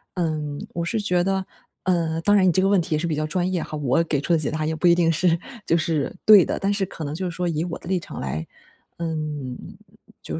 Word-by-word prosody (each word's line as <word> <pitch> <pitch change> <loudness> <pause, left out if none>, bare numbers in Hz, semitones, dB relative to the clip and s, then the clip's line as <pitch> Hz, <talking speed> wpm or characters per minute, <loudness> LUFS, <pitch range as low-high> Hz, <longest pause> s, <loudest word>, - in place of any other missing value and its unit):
嗯， 155 -4 -2
我 170 0 -2
是 225 - -1
觉 180 -3 +1
得， 190 -1 0 0.4
嗯， 165 -3 0
当 205 +4 +3
然 190 -2 +5
你 180 - +5
这 185 - +3
个 195 - +3
问 200 -2 +4
题 160 -1 -1
也 - - 0
是 170 - -2
比 160 -3 -1
较 155 0 -1
专 180 +3 -1
业 175 -3 0
哈， 155 - -5
我 145 +3 +2
给 150 -3 0
出 175 - -3
的 165 - +3
解 150 - -1
答 155 0 -2
也 160 - -1
不 165 +3 +2
一 170 - +6
定 165 -2 +3
是 170 +1 +2 0.3
就 165 - +2
是 160 -2 -1
对 210 -4 +9
的， - - -2
但 200 +1 0
是 200 -1 0
可 165 - -8
能 145 - -4
就 180 +2 -3
是 165 - -8
说 180 0 -1
以 160 +1 -1
我 170 - -4
的 - - -12
立 185 -2 +1
场 - - -8
来 75 +4 -4 0.5
嗯， 155 -6 -3 0.7
就 - - -4
165 Hz, 290 characters per minute, -23 LUFS, 155-180 Hz, 0.7 s, 对